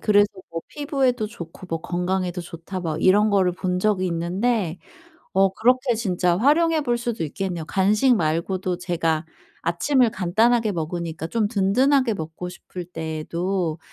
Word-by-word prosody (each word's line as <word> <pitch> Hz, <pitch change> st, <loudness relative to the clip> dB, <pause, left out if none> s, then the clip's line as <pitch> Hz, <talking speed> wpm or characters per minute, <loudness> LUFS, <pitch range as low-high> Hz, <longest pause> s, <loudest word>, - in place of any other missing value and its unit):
그래서 205 Hz, -1 st, +4 dB, 0.2 s
뭐 165 Hz, 0 st, -4 dB
피부에도 270 Hz, -6 st, 0 dB
좋고 180 Hz, -3 st, -10 dB
뭐 165 Hz, -1 st, -2 dB
건강에도 180 Hz, +1 st, -2 dB
좋다 170 Hz, +2 st, -7 dB
막 160 Hz, -3 st, -3 dB
이런 205 Hz, +3 st, +5 dB
거를 190 Hz, -3 st, +3 dB
본 180 Hz, 0 st, -2 dB
적이 195 Hz, -2 st, +1 dB
있는데 180 Hz, +2 st, -1 dB, 0.5 s
어 195 Hz, +1 st, +4 dB
그렇게 250 Hz, +3 st, +3 dB
진짜 180 Hz, -5 st, +1 dB
활용해 310 Hz, -, +3 dB
볼 240 Hz, -3 st, 0 dB
수도 235 Hz, -7 st, -2 dB
있겠네요. 175 Hz, +1 st, -4 dB
간식 210 Hz, +9 st, +3 dB
말고도 175 Hz, +1 st, -1 dB
제가 170 Hz, -3 st, -1 dB, 0.4 s
아침을 235 Hz, -, +2 dB
간단하게 220 Hz, +4 st, +2 dB
먹으니까 165 Hz, -1 st, -4 dB
좀 220 Hz, +2 st, 0 dB
든든하게 245 Hz, +5 st, +3 dB
먹고 160 Hz, 0 st, -6 dB
싶을 180 Hz, 0 st, -8 dB
때에도 165 Hz, +1 st, -3 dB
185 Hz, 320 characters per minute, -23 LUFS, 170-225 Hz, 0.5 s, 이런